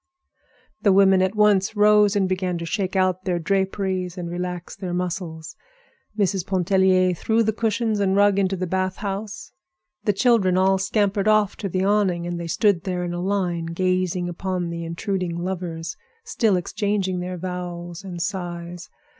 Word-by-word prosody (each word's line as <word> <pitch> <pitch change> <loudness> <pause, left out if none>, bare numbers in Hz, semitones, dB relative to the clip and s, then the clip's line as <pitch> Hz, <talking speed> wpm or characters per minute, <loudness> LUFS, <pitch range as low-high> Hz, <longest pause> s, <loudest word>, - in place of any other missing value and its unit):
The 200 - +4
women 190 -1 +5
at 190 +2 0
once 210 -1 +3
rose 210 0 +5
and 195 -2 +2
began 185 -1 -1
to 170 - -5
shake 190 +2 -2
out 185 -1 +1
their 180 -2 0
draperies 190 0 -1
and 170 -1 -5
relax 180 0 -5
their 180 -3 -4
muscles. 175 -2 -4 0.6
Mrs. 195 -3 +1
Pontellier 185 0 +2
threw 220 +6 +1
the 220 0 0
cushions 225 -1 0
and 195 -1 +2
rug 200 0 +4
into 195 -1 +1
the 185 0 -2
bath 185 +1 -1
house. 205 +1 -5 0.5
The 205 - +3
children 195 -4 +3
all 190 +1 +3
scampered 200 +1 0
off 215 -2 +3
to 200 - -4
the 185 +1 -1
awning, 195 -4 +1
and 175 0 -3
they 170 - -5
stood 185 +1 +2
there 180 -2 -2
in 175 0 -3
a 175 - -3
line, 180 -3 -1
gazing 185 +1 0
upon 175 0 -3
the 170 0 -5
intruding 180 +1 -3
lovers, 170 -3 -4 0.3
still 225 - +1
exchanging 190 0 -1
their 180 0 -4
vows 175 0 -6
and 180 -3 -7
sighs. 175 -2 -5
185 Hz, 165 wpm, -23 LUFS, 175-200 Hz, 0.6 s, women